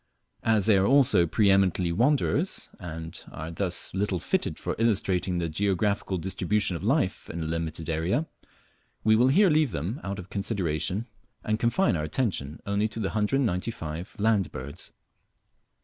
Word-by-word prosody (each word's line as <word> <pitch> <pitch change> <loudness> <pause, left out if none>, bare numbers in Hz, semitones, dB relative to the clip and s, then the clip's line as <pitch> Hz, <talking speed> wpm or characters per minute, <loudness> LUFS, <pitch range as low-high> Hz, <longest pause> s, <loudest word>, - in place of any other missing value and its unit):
As 110 -3 +2
they 105 -3 +5
are 95 - +2
also 130 -10 +4
pre 100 +4 +3
eminently 95 -3 +2
wanderers, 145 - +1
and 80 -3 -7
are 80 +2 -6
thus 90 +1 -1
little 95 0 0
fitted - - -1
for - - -3
illustrating 95 -5 +1
the 85 -1 -1
geographical 100 +3 0
distribution 95 +2 0
of 85 - -6
life 115 -3 0
in 85 0 -4
a - - -3
limited 80 -1 -3
area, 85 - 0 0.8
we 110 0 +5
will 120 +3 +4
here 185 +7 +5
leave 155 -2 +3
them 95 - -4
out 100 0 -4
of 90 -1 -9
consideration 95 -1 -1 0.4
and 110 0 0
confine 120 - +2
our 75 - -2
attention 75 - -2
only 100 +2 +1
to 110 +1 -7
the 100 -3 -1
195 105 - -2
land 105 -6 +2
birds. 70 +5 -7
95 Hz, 155 wpm, -27 LUFS, 85-110 Hz, 0.8 s, they